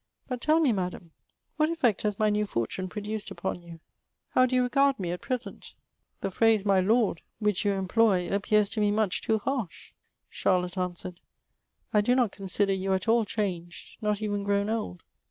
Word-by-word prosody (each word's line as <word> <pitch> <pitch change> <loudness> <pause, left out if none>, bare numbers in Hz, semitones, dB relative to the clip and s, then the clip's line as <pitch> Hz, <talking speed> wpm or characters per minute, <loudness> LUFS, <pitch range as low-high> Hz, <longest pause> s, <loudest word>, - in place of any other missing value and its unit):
But 250 -2 -4
tell 310 +4 +3
me, 300 -6 +3
Madam, 180 -4 -3 0.5
what 305 0 +3
effect 250 - +1
has 210 -2 -1
my 215 -1 +2
new 210 0 0
fortune 185 - -3
produced 210 +2 -5
upon 185 - -4
you? 170 -1 -12 0.5
How 255 0 +4
do 255 - -1
you 250 - +4
regard 275 +1 +2
me 175 -3 -2
at 180 - -5
present? 255 -2 -5 0.5
the 195 - -2
phrase 220 0 +3
my 195 -2 +4
Lord^ 215 -2 +2 0.2
which 210 -3 0
you 205 -1 +2
em 190 -1 -2
ploy, 195 -4 +3
appears 205 +1 +2
to 210 - -3
me 210 -1 +3
much 210 -2 +1
too 220 - +1
harsh/' 225 -5 -4 0.4
Charlotte 180 -1 0
answered: 180 -1 -4
'^ - - -25 0.7
I 210 - +5
do 245 +4 +2
not 245 -6 +2
consider 195 0 0
you 190 0 -1
at 190 0 -1
all 225 0 +4
changed; 180 -5 -4
not 210 0 -1
even 205 -1 -1
grown 200 +1 0
old. 90 - -4
205 Hz, 190 wpm, -28 LUFS, 185-225 Hz, 0.7 s, I